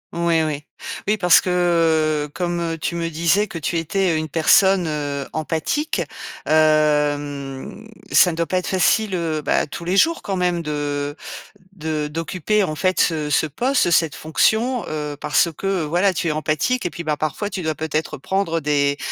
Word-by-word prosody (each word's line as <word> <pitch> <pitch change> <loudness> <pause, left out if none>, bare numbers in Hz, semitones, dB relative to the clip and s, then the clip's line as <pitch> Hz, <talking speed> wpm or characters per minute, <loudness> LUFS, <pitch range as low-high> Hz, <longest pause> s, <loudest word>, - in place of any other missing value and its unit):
Oui, 170 -1 +2
oui. 150 -2 -3 0.4
Oui 210 +1 +2
parce 180 -3 +5
que, 165 -4 +1
comme, 175 -1 -2
heu, 165 -1 -2
tu 160 - -3
me 170 -1 -2
disais, 170 +6 +1
que 175 - -7
tu 165 +1 -1
étais 175 +1 0
une 155 0 -2
personne, 180 +4 +4
heu, 145 -2 -3
empathique, 160 - -1 0.4
hem, 150 +2 +1 0.2
ça 180 - +6
ne - - -5
doit 170 - +1
pas 185 +4 -1
être 180 - -6
facile, 195 +2 +2
heu, 160 -3 -2
bah, - - +1
tous 170 +3 -8
les 185 +3 0
jours, 330 +8 +3
quand 195 - -3
même 180 -2 0
de 145 -2 -3 0.6
de 155 -4 -3
d'occuper, 165 +6 -1
en 155 -5 -2
fait 185 +3 0
ce 155 -3 0
ce 155 - +2
poste, 245 - +1
cette 165 -3 +3
fonction, 220 +10 +1
heu, 150 -1 -4
parce 150 +3 +2
que, 195 -2 -1
voilà, 175 +6 +1
tu 175 0 -2
es - - +1
empathique 155 - -1
et 175 - -1
puis, 170 - -7
bah, 155 -2 -1
parfois, 155 +8 -2
tu 190 -3 -5
dois 160 -1 0
peut-être 155 0 -3
prendre 170 +1 -1
des, 145 -1 +1
165 Hz, 180 wpm, -21 LUFS, 150-180 Hz, 0.6 s, ça